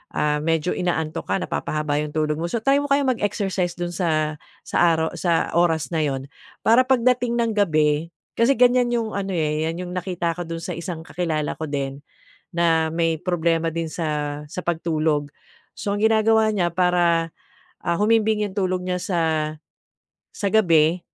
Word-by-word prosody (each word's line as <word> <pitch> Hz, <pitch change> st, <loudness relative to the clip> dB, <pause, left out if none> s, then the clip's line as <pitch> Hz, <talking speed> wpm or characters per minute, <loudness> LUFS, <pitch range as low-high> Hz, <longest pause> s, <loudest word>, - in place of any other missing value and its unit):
ah, 150 Hz, 0 st, +1 dB
medyo 165 Hz, +2 st, 0 dB
inaantok 160 Hz, -3 st, -2 dB
ka 195 Hz, -, 0 dB
napapahaba 150 Hz, -1 st, -2 dB
'yong 150 Hz, 0 st, -4 dB
tulog 155 Hz, 0 st, 0 dB
mo. 170 Hz, -, -1 dB
So 220 Hz, +5 st, -3 dB
try 275 Hz, +2 st, +4 dB
mo 285 Hz, -, -2 dB
kayang 280 Hz, -1 st, +3 dB
mag-exercise 195 Hz, -5 st, -1 dB
do'n 175 Hz, 0 st, -4 dB
sa 155 Hz, -4 st, -1 dB, 0.2 s
sa -, -, -3 dB, 0.2 s
araw 160 Hz, 0 st, -1 dB
sa 170 Hz, -2 st, 0 dB
oras 160 Hz, -5 st, +1 dB
na 160 Hz, -3 st, +1 dB
'yon 135 Hz, 0 st, -4 dB, 0.3 s
para 245 Hz, +3 st, +5 dB
pagdating 250 Hz, -1 st, +2 dB
ng 235 Hz, -1 st, +1 dB
gabi 155 Hz, -6 st, +2 dB, 0.3 s
kasi 235 Hz, +4 st, +4 dB
ganiyan 245 Hz, 0 st, +3 dB
'yong 225 Hz, -3 st, -1 dB
ano, 195 Hz, -1 st, -3 dB
eh, 155 Hz, -2 st, 0 dB
'yan 165 Hz, +2 st, -3 dB
'yong 180 Hz, 0 st, -6 dB
nakita 175 Hz, -2 st, -2 dB
ko 175 Hz, -, -4 dB
do'n 165 Hz, 0 st, -5 dB
sa -, -, -5 dB
isang 170 Hz, -1 st, -5 dB
kakilala 160 Hz, -3 st, -2 dB
ko 160 Hz, -, -4 dB
din 140 Hz, -1 st, -4 dB, 0.4 s
na 165 Hz, -2 st, +2 dB
may 165 Hz, -1 st, 0 dB
problema 165 Hz, -2 st, +1 dB
din 165 Hz, +1 st, -3 dB
sa 150 Hz, -2 st, -3 dB
sa 180 Hz, +3 st, -6 dB
pagtulog. 160 Hz, -3 st, 0 dB, 0.5 s
So 200 Hz, -, -2 dB
ang 205 Hz, -, -2 dB
ginagawa 220 Hz, 0 st, +4 dB
niya 180 Hz, -5 st, 0 dB
para, 175 Hz, -2 st, +2 dB, 0.5 s
ah, 170 Hz, 0 st, 0 dB
humimbing 220 Hz, 0 st, +3 dB
'yong 190 Hz, -, -12 dB
tulog 185 Hz, -2 st, 0 dB
niya 180 Hz, -1 st, -2 dB
sa 180 Hz, -3 st, -1 dB, 1.2 s
sa 200 Hz, -, -1 dB
gabi, 170 Hz, -5 st, +4 dB
170 Hz, 170 wpm, -23 LUFS, 155-205 Hz, 1.2 s, para